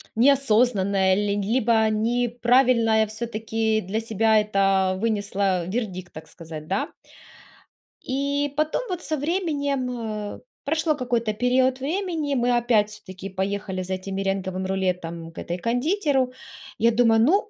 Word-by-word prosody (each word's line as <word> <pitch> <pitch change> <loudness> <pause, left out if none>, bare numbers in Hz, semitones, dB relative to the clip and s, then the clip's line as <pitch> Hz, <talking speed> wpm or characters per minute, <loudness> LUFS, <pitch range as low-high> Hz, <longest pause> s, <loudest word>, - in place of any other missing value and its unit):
неосознанное 220 -7 +3
ли 205 0 0
либо 220 0 +2
неправильное 235 0 +2
все-таки 220 0 -1
для 195 +5 -2
себя 220 0 +3
это 195 -2 +2
вынесла 200 -4 0
вердикт, 185 -4 -4
так 155 - -10
сказать, 160 -2 -9
да. 195 +3 -2 1.1
И 280 +2 -1
потом 310 +8 +1
вот 360 -2 -3
со 310 -3 -2
временем, 275 - -2
э, - - -16 0.3
прошло 315 +1 +1
какой-то 235 -4 -1
период 255 +3 +2
времени, 315 -1 -2
мы 245 0 +2
опять 230 -3 +2
все-таки 195 -2 -9
поехали 190 0 -3
за 185 +1 -3
этим 190 +1 -6
меренговым 190 -1 -2
рулетом 180 -3 -2
к - - -24
этой 175 - -4
кондитеру. 260 - 0 0.4
Я 230 +1 +4
думаю: 225 -1 +4
"Ну, 390 - +3
225 Hz, 125 wpm, -24 LUFS, 195-255 Hz, 1.1 s, Я